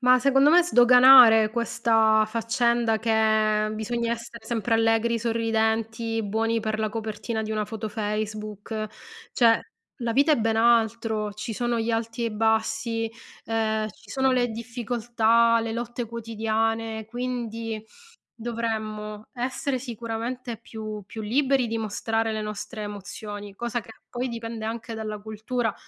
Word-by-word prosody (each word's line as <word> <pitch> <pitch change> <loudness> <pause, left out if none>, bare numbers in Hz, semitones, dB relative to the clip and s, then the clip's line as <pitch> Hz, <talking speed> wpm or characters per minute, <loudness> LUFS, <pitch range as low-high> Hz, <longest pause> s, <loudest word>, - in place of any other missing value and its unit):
Ma 250 0 +5
secondo 275 +2 +4
me 350 +2 +7
sdoganare 245 -5 +7
questa 225 -1 +2
faccenda 230 0 +1
che 215 -1 +2
bisogna 235 +2 -2
essere 235 0 -8
sempre 230 0 -1
allegri, 225 +1 +2
sorridenti, 225 0 0
buoni 225 +2 0
per 215 0 -2
la 215 - 0
copertina 220 +1 -4
di 215 - -5
una 215 -1 -1
foto 220 0 -5
Facebook; 215 0 -4 0.5
cioè 230 -2 +4 0.4
la 235 -1 0
vita 285 +5 +4
è - - +4
ben 225 -1 0
altro. 225 -2 +2
Ci 225 +2 -5
sono 240 +1 -1
gli 225 +1 -1
alti 230 +1 -2
e - - +1
i 230 - -2
bassi, 225 +1 0 0.3
ehm, 220 -1 0
ci - - -21
sono 265 -1 +1
le 245 -1 +2
difficoltà, 230 0 +1
le 225 0 -3
lotte 240 0 -4
quotidiane; 225 0 -2
quindi, 230 -2 -4 0.5
dovremmo 220 -2 -4
essere 260 +2 -2
sicuramente 235 0 -5
più 215 -2 -7
più 220 - -7
liberi 265 +3 +2
di 230 - -2
mostrare 225 +1 -1
le 215 0 -2
nostre 210 +1 -6
emozioni, 205 0 -7
cosa 240 +1 -2
che - - -18 0.2
poi 250 +1 -3
dipende 230 -2 -5
anche 230 +1 -5
dalla 215 -1 -4
cultura, 220 +2 -3
225 Hz, 140 wpm, -25 LUFS, 220-235 Hz, 0.5 s, me